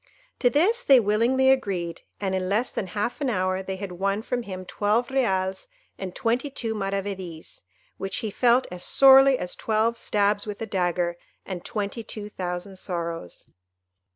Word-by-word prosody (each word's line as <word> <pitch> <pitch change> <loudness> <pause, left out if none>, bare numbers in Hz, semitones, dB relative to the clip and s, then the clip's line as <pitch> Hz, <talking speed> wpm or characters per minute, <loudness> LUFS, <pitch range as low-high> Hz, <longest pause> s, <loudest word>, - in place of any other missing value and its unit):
To 245 - +4
this 375 - +3
they 270 - +6
willingly 235 +5 +3
agreed, 190 -10 -1 0.2
and 195 -2 -1
in 185 -1 -1
less 215 +5 +1
than 190 - -3
half 215 +9 -3
an 275 - +1
hour 185 -3 0
they 190 0 -4
had 190 0 -6
won 195 +4 -1
from 245 +1 -2
him 185 -4 -7
twelve 215 +7 0
reals 190 -8 0 0.3
and 185 -2 -6
twenty 245 +3 0
two 230 -4 -3
maravedis, 195 -5 -4 0.4
which 195 - -3
he 215 - -2
felt 245 +3 +3
as 180 -1 -6
sorely 270 0 +7
as 180 - -5
twelve 225 +1 0
stabs 205 0 +1
with 205 -1 -5
a 225 - -3
dagger 175 -3 -1 0.3
and 185 -3 -6
twenty 210 +2 -3
two 210 -1 -7
thousand 185 0 -5
sorrows. 170 - -5
205 Hz, 165 wpm, -25 LUFS, 185-235 Hz, 0.4 s, sorely